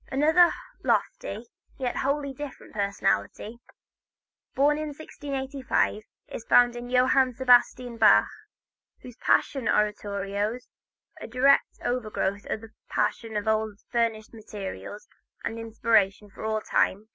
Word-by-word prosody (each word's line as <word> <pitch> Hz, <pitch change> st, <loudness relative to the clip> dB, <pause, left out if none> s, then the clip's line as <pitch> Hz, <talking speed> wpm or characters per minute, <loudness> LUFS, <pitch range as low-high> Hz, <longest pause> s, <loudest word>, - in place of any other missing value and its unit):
Another 320 Hz, +6 st, +5 dB, 0.3 s
lofty, 210 Hz, +4 st, -1 dB, 0.3 s
yet 250 Hz, -2 st, -2 dB
wholly 280 Hz, 0 st, -1 dB
different 285 Hz, 0 st, -9 dB
personality, 200 Hz, -, -1 dB, 1.0 s
born 290 Hz, +2 st, +3 dB
also -, -, -2 dB
in 295 Hz, -2 st, -7 dB
1685, 270 Hz, -6 st, -2 dB, 0.3 s
is -, -, -7 dB
found 245 Hz, 0 st, +5 dB
in 240 Hz, 0 st, -7 dB
Johann 255 Hz, 0 st, +3 dB
Sebastian 245 Hz, -1 st, +3 dB
Bach, 225 Hz, -2 st, +6 dB, 0.8 s
whose 250 Hz, -2 st, -10 dB
Passion 270 Hz, -4 st, +1 dB
Oratorios, 205 Hz, +2 st, -1 dB, 0.5 s
a -, -, -6 dB
direct 260 Hz, +4 st, +3 dB
outgrowth 215 Hz, -5 st, -2 dB
of 215 Hz, -, -2 dB
the 225 Hz, -1 st, -12 dB, 0.2 s
Passion 225 Hz, -2 st, -1 dB
plays 210 Hz, -, 0 dB
of 205 Hz, -, -12 dB
old, 215 Hz, -1 st, 0 dB
furnish 230 Hz, -2 st, -1 dB
materials 210 Hz, -1 st, -8 dB, 0.4 s
and 225 Hz, -, -4 dB
inspiration 215 Hz, -3 st, +1 dB
for 220 Hz, -, -8 dB
all 220 Hz, 0 st, -1 dB
time. 210 Hz, 0 st, 0 dB
230 Hz, 120 wpm, -26 LUFS, 210-260 Hz, 1.0 s, Bach